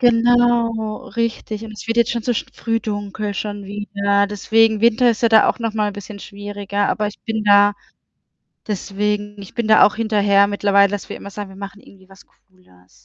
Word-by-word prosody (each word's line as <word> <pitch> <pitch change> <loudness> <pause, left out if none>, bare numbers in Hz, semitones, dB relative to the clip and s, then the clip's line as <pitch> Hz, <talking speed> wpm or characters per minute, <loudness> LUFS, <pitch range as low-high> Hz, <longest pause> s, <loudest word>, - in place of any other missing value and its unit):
Genau, 240 -1 +2
richtig. 225 -2 -3
Und 215 - -9
es 210 -1 -10
wird 230 +1 -2
jetzt 235 0 +3
schon 235 -1 -2
so 245 - 0
sch - - -3
früh 225 0 -2
dunkel 205 -1 -4
schon 205 -1 -5
wieder. 200 0 -1
Deswegen 220 +1 +2
Winter 235 +2 +4
ist 225 - -4
ja 230 - +5
da 220 -1 +5
auch - - -2
nochmal 220 -2 -1
ein 205 - -5
bisschen 205 0 -9
schwieriger, 205 0 -4
aber 210 - -1
ich 205 - -8
bin 220 -1 -3
da 205 0 +5 0.9
deswegen 205 0 -3
ich 195 - -13
bin 235 -3 -2
da 215 0 +6
auch 210 - +2
hinterher 205 -3 +3
mittlerweile, 200 -1 +3
dass 205 -1 -5
wir - - -6
immer 200 - -10
sagen: 205 -1 -7
„Wir 190 - -13
machen 200 0 -9
irgendwie 190 -2 -19
was 195 0 -17
Cooles.“ 135 - -27
210 Hz, 200 wpm, -19 LUFS, 200-225 Hz, 0.9 s, da